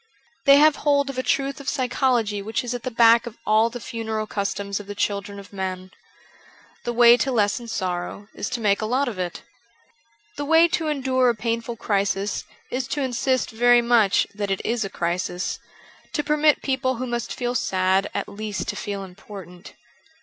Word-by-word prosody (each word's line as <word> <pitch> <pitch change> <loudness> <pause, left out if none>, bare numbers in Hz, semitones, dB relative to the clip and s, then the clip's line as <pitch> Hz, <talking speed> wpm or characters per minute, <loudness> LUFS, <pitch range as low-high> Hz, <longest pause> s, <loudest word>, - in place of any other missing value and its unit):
They 275 - +9
have 305 0 +5
hold 280 -1 +2
of 255 - -5
a - - +2
truth 275 +1 -1
of 275 -1 -3
psychology 250 -5 0
which 220 +4 -2
is 245 0 -3
at 245 - -4
the 255 - -3
back 230 0 +5
of 235 - -9
all 220 +2 +4
the 245 +1 -7
funeral 220 -2 -4
customs 200 -1 -3
of 205 - -10
the 205 - -6
children 200 0 -2
of 200 0 -12
men. 185 -1 -4 0.9
The 240 - 0
way 240 0 +7
to 265 - 0
lessen 225 +1 0
sorrow 185 -1 -4
is - - -4
to 240 - -3
make 200 -1 +2
a 215 - -1
lot 260 +5 +1
of 215 -6 -5
it. 180 -1 -4 0.9
The 290 - -3
way 325 +3 +6
to 330 -2 -1
endure 260 -4 +2
a 235 - +1
painful 230 +2 -2
crisis 200 -1 -1 0.3
is 250 0 -2
to 290 - -2
insist 255 0 0
very 240 +1 +4
much 235 -4 +4
that 205 -1 -3
it 195 - -2
is 235 0 0
a 195 - -4
crisis; 175 0 -2 0.5
to 295 - 0
permit 300 0 +3
people 260 -1 0
who 255 +2 -4
must 240 -2 -3
feel 245 -1 -2
sad 190 -3 +1
at - - -3
least 210 0 -5
to - - -2
feel 200 -1 -4
important. 185 -1 -11
230 Hz, 190 wpm, -23 LUFS, 200-255 Hz, 0.9 s, They